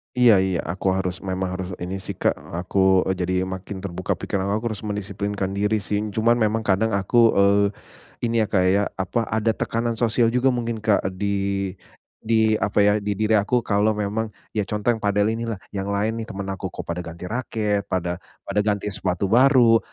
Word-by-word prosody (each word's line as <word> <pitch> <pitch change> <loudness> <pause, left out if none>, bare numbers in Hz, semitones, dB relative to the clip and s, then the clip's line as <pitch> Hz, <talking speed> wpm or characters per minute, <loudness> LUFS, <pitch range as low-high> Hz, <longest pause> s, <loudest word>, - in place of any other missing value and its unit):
Iya 125 -2 +6
iya, 95 -2 0
aku 90 +4 -3
harus, 95 -1 -2
memang 95 -1 -3
harus 95 -1 -4
ini 90 +2 -4
sih - - -5
Kak, - - +2 0.2
aku, 95 +1 +3
eee, 95 - +1
jadi 90 +1 -1
makin 95 +1 -6
terbuka 90 -2 -2
pikiran 95 0 -3
aku 110 - -3
harus 110 - -6
mendisiplinkan 100 -1 -3
diri 105 +2 +1
sing. 105 +3 -2
Cuman 115 +2 +3
memang 110 0 +1
kadang 110 +2 +1
aku, 100 +4 0 0.2
eee, 100 +1 +4 0.6
ini 115 -1 +2
ya - - 0
Kak 95 -2 +3
ya, 100 +2 +3 0.2
apa, 95 +5 -1
ada 110 +1 +1
tekanan 115 +2 -1
sosial 115 0 +2
juga 125 +2 +3
mungkin 115 -3 -2
Kak, 105 -4 +2
di 100 +2 -2 0.9
di 110 -1 +2
apa 100 +2 +2
ya, 105 0 +5
di 105 0 -2
diri 110 +2 +2
aku 120 +4 +1
kalau 105 0 +2
memang 105 +2 -1 0.2
ya 105 -3 -2
contoh 105 +3 0
yang 115 - 0
padel 105 0 +1
inilah, 115 0 -2 0.2
yang 100 -1 -4
lain 105 +3 -1
nih 115 - -4
temen 100 -2 -6
aku 95 0 -4
kok 90 - -6
pada 85 +1 -4
ganti 85 +1 -7
raket, 105 -4 -1
pada 90 -1 -2 0.2
pada - - -3
ganti 105 0 0
sepatu 95 0 -2
baru, 120 -1 +6
105 Hz, 195 wpm, -23 LUFS, 95-110 Hz, 0.9 s, Iya